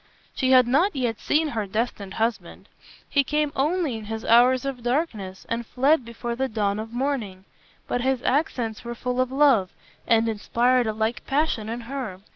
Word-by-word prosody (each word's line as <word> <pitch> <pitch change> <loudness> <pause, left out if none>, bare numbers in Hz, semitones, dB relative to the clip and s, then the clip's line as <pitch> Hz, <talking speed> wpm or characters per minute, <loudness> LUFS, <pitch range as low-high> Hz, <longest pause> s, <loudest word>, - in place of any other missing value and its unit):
She 260 - 0
had 255 -1 +7
not 300 +10 +2
yet 240 -5 -1
seen 310 +1 +1
her 220 -6 -3
destined 205 -2 -3
husband. 225 +1 -3 0.4
He 280 - +2
came 300 +1 0
only 305 -2 0
in 220 - -9
the 225 0 0
hours 250 +2 +5
of 270 -3 -4
darkness 235 - -2
and 230 +1 -2
fled 270 +5 +2
before 235 0 -5
the 265 +2 -1
dawn 210 -3 -1
of 220 +1 -6
morning, 235 -7 -3 0.4
but 245 - -1
his 260 -1 0
accents 250 -6 -1
were 235 0 -5
full 250 +2 -1
of 255 0 -1
love, 265 -9 +4 0.4
and 230 0 +3
inspired 235 +3 +1
a 220 - -1
like 220 +3 -2
passion 275 -7 0
in 235 +1 -4
her. 235 -6 -6
240 Hz, 180 wpm, -24 LUFS, 220-270 Hz, 0.4 s, had